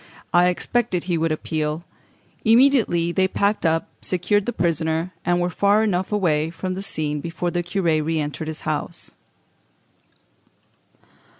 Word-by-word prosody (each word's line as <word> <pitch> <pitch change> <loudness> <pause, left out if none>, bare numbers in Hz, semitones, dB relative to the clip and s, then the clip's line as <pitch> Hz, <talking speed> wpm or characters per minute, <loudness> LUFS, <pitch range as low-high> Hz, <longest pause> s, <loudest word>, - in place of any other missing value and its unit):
I 175 +1 +5
expected 185 +1 0
he 175 -1 -1
would 165 0 +1
appeal." 155 0 -2 0.6
Immediately 225 -8 +4
they 190 +1 +2
packed 200 -1 +1
up, 165 0 0 0.2
secured 195 +3 0
the - - +1
prisoner, 165 -2 -1
and 175 0 +1
were 175 0 0
far 205 +3 +3
enough 190 -3 0
away 160 -7 +1
from 185 +2 -4
the 190 - -5
scene 150 -6 -2
before 170 +2 -3
the 175 - 0
curé 170 -3 0
re 160 +1 -1
entered 150 +1 -4
his 160 0 -5
house. 155 -1 -4
175 Hz, 140 wpm, -22 LUFS, 160-195 Hz, 0.6 s, I